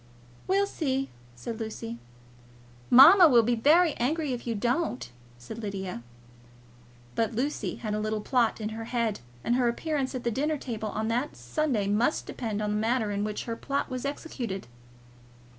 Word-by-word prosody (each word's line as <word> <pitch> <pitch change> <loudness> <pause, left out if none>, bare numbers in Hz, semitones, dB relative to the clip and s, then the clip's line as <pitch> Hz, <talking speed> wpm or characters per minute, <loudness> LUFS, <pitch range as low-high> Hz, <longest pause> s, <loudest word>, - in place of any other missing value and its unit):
"We'll 395 +2 +3
see," 270 -8 -2 0.2
said 220 - -6
Lucy. 120 - -5 0.9
"Mamma 330 +8 +9
will 240 -4 +6
be 240 +2 +1
very 305 +8 +4
angry 290 +3 0
if 240 0 -6
you 230 - -1
don't," 210 - -1 0.3
said 125 - -9
Lydia. 190 - -5 1.1
But 225 0 -1
Lucy 275 +6 -2
had 215 -2 -4
a 210 - -1
little 215 0 -2
plot 235 0 +1
in 215 -1 -3
her 225 +1 -6
head, 230 -3 -1 0.2
and 240 - +1
her 250 -2 +2
appearance 275 +2 -1
at 250 - -4
the 235 - 0
dinner 295 +6 0
table 225 -5 -4
on 215 +1 -2
that 245 +5 -1
Sunday 215 - -1
must 210 +8 +1
depend 215 -3 -3
on 210 - -1
the 210 - 0
manner 225 0 0
in 200 0 -1
which 210 0 -3
her 230 - -3
plot 275 +3 -2
was 255 -1 -3
executed. 260 - -4
235 Hz, 170 wpm, -28 LUFS, 215-275 Hz, 1.1 s, Mamma